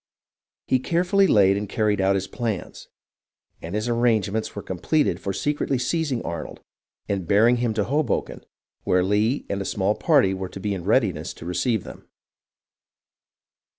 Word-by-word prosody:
He 130 - +2
carefully 180 +7 +2
laid 100 - +4
and 100 -1 -4
carried 105 -3 +1
out 95 +1 +3
his 95 0 -1
plans, 110 -5 -5 0.7
and 85 +4 -6
his 105 +2 -1
ar 120 - +1
rangements 110 -3 0
were 100 - -5
completed 95 - 0
for 100 - -3
secretly 140 +6 -1
seizing 135 -1 -1
Arnold 85 - -6 0.5
and 95 -4 -2
bearing 115 +5 +4
him 120 -2 -1
to 105 - +1
Hoboken, 145 +7 -1 0.4
where 90 0 +2
Lee 105 +7 +1
and 100 0 -3
a - - -1
small 95 +1 0
party 135 - +3
were 95 -1 -5
to 95 - -9
be 100 +1 -2
in 90 -3 -6
readiness - - +1
to - - -11
receive 90 +5 0
them. - - -12
105 Hz, 160 wpm, -24 LUFS, 95-125 Hz, 0.7 s, laid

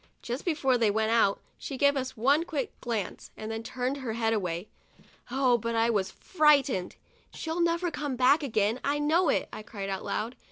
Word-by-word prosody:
Just 245 +3 -4
before 270 -7 +2
they 225 -2 +3
went 220 +2 +1
out, 225 -4 +3 0.2
she 275 - -5
gave 285 +1 +4
us 260 -2 -3
one 280 +8 +3
quick 295 -6 -3
glance, 225 -6 -4
then 225 +1 -5
turned 255 +3 -3
her 255 -5 -4
head 225 0 +1
away. 180 -2 -2 0.6
Oh, 250 -1 +2
but 230 +1 -2
I 230 +1 +3
was 195 -4 0
frightened! 280 - +2 0.2
" - - -34
She'll 325 +2 -3
never 340 +1 +1
come 290 -3 -3
back 260 +5 +4
again, 220 -3 0
I 285 +1 +1
know 315 +3 +2
it!' - - +1
I 215 - -6
cried 200 -2 -6
out 190 -1 -3
loud. 230 +4 -3
250 Hz, 195 wpm, -28 LUFS, 220-285 Hz, 0.6 s, gave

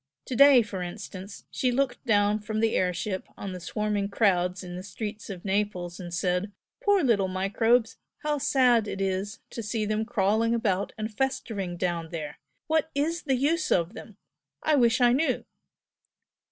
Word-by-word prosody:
To 255 - -4
day, 275 -1 +8
for 200 -3 -6
instance, 190 +2 -7
she 255 - +1
looked 245 0 0
down 205 -1 +3
from 215 +1 -3
the 225 0 +2
air 180 -1 +2
ship 190 +1 -4
on 195 - -5
the 180 - -6
swarming 205 +2 -2
crowds 185 -3 +1
in 180 -1 -7
the 180 - -5
streets 205 +2 -6
of 185 -2 -7
Naples 190 -3 -1
and 175 -2 -7
said 180 +3 0 0.3
'Poor 405 -3 +4
little 210 -7 +3
microbes! 220 +5 +1 0.3
How 300 -1 0
sad 245 -5 +3
it 195 - -4
is 195 +2 -2
to 230 - -5
see 215 0 -2
them 215 +1 0
crawling 220 +1 +2
about 200 -4 0
and 215 0 -4
festering 205 -9 -2
down 170 -2 -2
there! 155 -3 -6 0.3
What 315 0 +1
IS 320 +4 0
the 270 -3 +1
use 305 +7 +1
of 170 +2 +2
them! 220 -2 -11 0.5
I 310 - +2
wish 240 -2 +3
I 240 0 +6
knew!' 285 +6 +1
210 Hz, 175 wpm, -27 LUFS, 185-240 Hz, 0.5 s, day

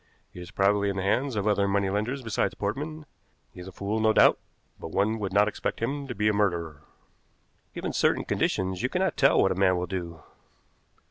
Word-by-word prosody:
He 90 - -9
is 90 - -9
probably 100 +1 +1
in 100 - -3
the 95 - -2
hands 125 +6 0
of 105 -1 -1
other 100 -1 +2
money 100 0 +1
lenders 110 +7 -2
besides 115 -2 -1
Portman; 150 +9 -4 0.5
he - - -12
is 90 - -9
a - - -8
fool 100 +4 -3
no 110 0 +3
doubt, - - +5 0.4
but - - -7
one 105 +6 0
would 100 -2 -3
not 105 +2 +4
expect 105 - -3
him 140 +4 -3
to 125 - -6
be 105 +1 0
a 105 - +3
murderer." 85 -7 -1 0.9
"Given - - -4
certain - - +1
conditions, 95 -1 -1
you 125 - 0
cannot 185 +1 0
tell 135 - +4
what 95 - +3
a - - +2
man 95 -1 +2
will 90 - -2
do." 85 -4 -6
100 Hz, 210 wpm, -26 LUFS, 95-115 Hz, 0.9 s, doubt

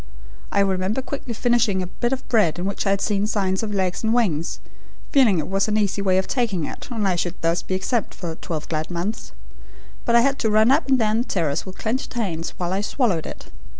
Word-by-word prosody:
I 200 - +3
remember 195 +5 0
quickly 265 -4 -5
finishing 230 -5 +2
a - - -3
bit 240 +7 -2
of 265 0 -3
bread 210 -10 +3
in 175 - -3
which 200 +1 -2
I - - +4
had 200 0 +1
seen 205 -1 +1
signs 190 -3 0
of 220 -2 -3
legs 190 -1 -1
and 220 +1 +2
wings, 170 -10 0 0.5
feeling 250 - +5
it 155 - -1
was 195 +2 +1
an 215 0 +1
easy 205 -1 +1
way 190 -2 +3
of 190 - +2
taking 215 - 0
it - - -8
and 220 -5 -1
I 185 - +2
should 175 0 -2
thus 165 +1 +1
be 185 - -2
exempt 210 +4 -1
for 170 -3 -5
twelve 160 -1 -5
glad 155 -1 -2
months; 180 - -3 0.7
but 235 - +2
I 235 - +7
had 275 +3 +1
to 220 - +1
run 215 +3 +5
up 290 +3 +3
and 265 - +5
down 220 -1 +2
the - - -3
terrace 165 -2 -1
with 190 - -8
clenched 245 +3 -2
hands 170 -8 -2
while 175 0 -2
I 195 - 0
swallowed 205 - 0
it. - - -9
200 Hz, 235 wpm, -23 LUFS, 180-230 Hz, 0.7 s, I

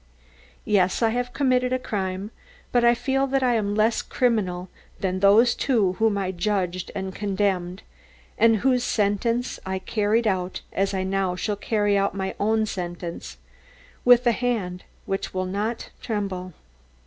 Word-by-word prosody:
Yes, 195 0 +2
I 225 - +4
have 245 +2 -2
committed 255 -2 +1
a 255 - +2
crime, 195 -3 -3 0.4
but 245 -1 +3
I 235 0 +5
feel 270 +2 0
that 270 0 +1
I 250 -1 +3
am 205 -3 0
less 220 +2 +2
criminal 190 -8 0 0.3
than 185 -1 -1
those 210 +5 +5
two 215 -9 +1
whom 220 -2 +2
I 190 -2 -1
judged 185 -1 -1
and 190 -1 -4
condemned, 190 -2 -1 0.5
and 225 0 +5
whose 250 -2 +3
sentence 230 +4 0
I 190 0 -3
carried 215 +4 0
out 185 -3 -1
as 195 0 0
I 190 - -1
now 190 -1 0
shall 205 +3 -2
carry 205 -1 +1
out 200 0 0
my 190 -1 -2
own 220 +1 +2
sentence 175 -3 -6 0.7
with 245 0 +6
a 240 - +5
hand 215 -7 -2 0.2
which 195 -1 -3
will 185 0 0
not 210 +5 -3
tremble. 195 -5 -3
205 Hz, 155 wpm, -24 LUFS, 190-235 Hz, 0.7 s, with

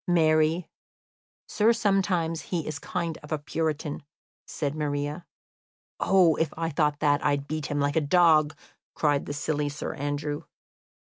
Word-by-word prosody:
"Marry, 160 0 +3 0.8
sir, 220 +1 +3
sometimes 190 -7 +1
he 170 -4 -2
is 155 -2 -4
a - - -26
kind 165 -2 -3
of 150 -1 -5
puritan," 155 -1 -2 0.5
said 145 -2 -3
Maria. 150 +2 -3 0.7
"Oh, 180 -5 +4
if 160 -2 0
I 165 0 -1
thought 150 -1 +1
that, 145 -1 +2
I'd 145 -1 0
beat 155 -2 -3
him 145 - -2
like 145 0 0
a 160 - +3
dog!" 155 -1 +4 0.4
cried 145 -2 +1
the - - -3
silly 145 0 -1
Sir 145 - -5
Andrew. 145 0 -3
155 Hz, 145 wpm, -27 LUFS, 145-165 Hz, 0.8 s, Oh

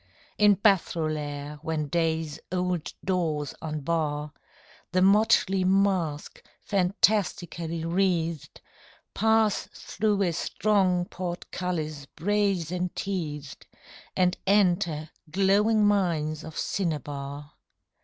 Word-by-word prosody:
In 210 -1 +6
Bathrolaire 155 -7 0
when 155 -2 -2
Day's 160 -1 -1
old 180 -2 -1
doors 160 -6 -1
unbar 150 -1 -2 0.6
The 185 - +3
motley 195 -1 +4
mask, 185 -5 +1 0.2
fantastically 180 -4 0
wreathed, 170 -3 -1 0.5
Pass 220 -1 +2
through 210 -2 0
a 175 - +1
strong 185 -1 +1
portcullis 175 -5 -4
brazen 180 -2 0
teethed, 150 -7 -5 0.5
And 180 0 +3
enter 175 -6 +2 0.2
glowing 205 +4 +3
mines 165 -7 +1
of 160 0 -9
cinnabar. 145 -4 -3
175 Hz, 85 wpm, -27 LUFS, 155-195 Hz, 0.6 s, In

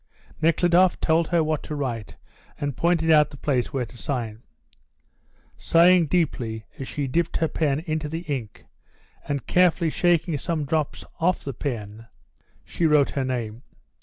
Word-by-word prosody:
Nekhludoff 175 +2 +3
told 160 0 +2
her 170 -2 +2
what 155 -1 -1
to 150 - -6
write 120 -7 -4 0.4
and 145 -2 -2
pointed 165 -1 +2
out 150 -1 +5
the 145 - -12
place 130 -4 -1
where 130 -3 -1
to 120 - -15
sign. 115 -5 -4 1.2
Sighing 170 0 +5
deeply 120 -10 -1
as 135 - -5
she 145 - -3
dipped 165 +6 0
her 160 - +1
pen 150 -2 0
into 155 -2 -3
the 165 +2 -4
ink, 135 - -5 0.6
and 140 -2 -2
carefully 175 -2 +3
shaking 170 -3 +1
some 155 -1 -2
drops 155 0 -2
off 175 +2 +1
the 140 - -4
pen, 115 -4 -5 0.6
she 170 - 0
wrote 150 -2 +4
her 135 - -1
name. 120 -3 -3
150 Hz, 155 wpm, -24 LUFS, 130-165 Hz, 1.2 s, out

